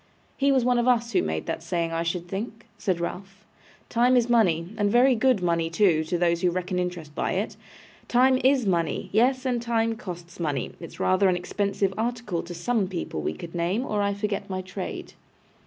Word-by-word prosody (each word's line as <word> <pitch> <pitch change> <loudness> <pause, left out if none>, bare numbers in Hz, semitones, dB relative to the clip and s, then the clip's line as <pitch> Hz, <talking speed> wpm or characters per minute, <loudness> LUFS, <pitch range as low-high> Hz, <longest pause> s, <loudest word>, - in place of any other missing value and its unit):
'He 280 0 +2
was 260 -3 +3
one 250 -1 +3
of 240 - +1
us 235 -1 +2
who - - +3
made 80 0 -2
that - - -3
saying, 170 0 -2
I 165 0 -1
should 170 +1 -2
think,' 220 +5 -5
said 190 -4 -1
Ralph. 195 +4 -6 0.4
'Time 250 +2 +3
is 240 0 +2
money, 180 -6 +2
and 205 -2 +1
very 255 +3 +5
good 245 -4 +2
money 170 -1 +1
too, 170 -3 +3
to 175 +3 -1
those 170 0 +1
who 180 - +3
reckon 180 +1 -2
interest 175 -4 -4
by - - -1
it. - - -2 0.5
Time 255 +1 +4
IS 260 -2 +4
money! 170 -6 0
Yes, 255 +4 +3
and 245 -2 0
time 230 -1 0
costs 175 -4 -9
money; 150 -5 -2
it's 170 - -10
rather 185 +1 +3
an 180 - +2
expensive 195 +2 -1
article 225 -6 -2
to 175 0 -8
some 200 +3 0
people 170 - -4
we 75 - -2
could 165 - -9
name, 180 +8 0
or 210 -4 -1
I 200 0 0
forget 200 -1 -3
my 185 0 -3
trade. 185 +1 -6
195 Hz, 205 wpm, -26 LUFS, 170-235 Hz, 0.5 s, very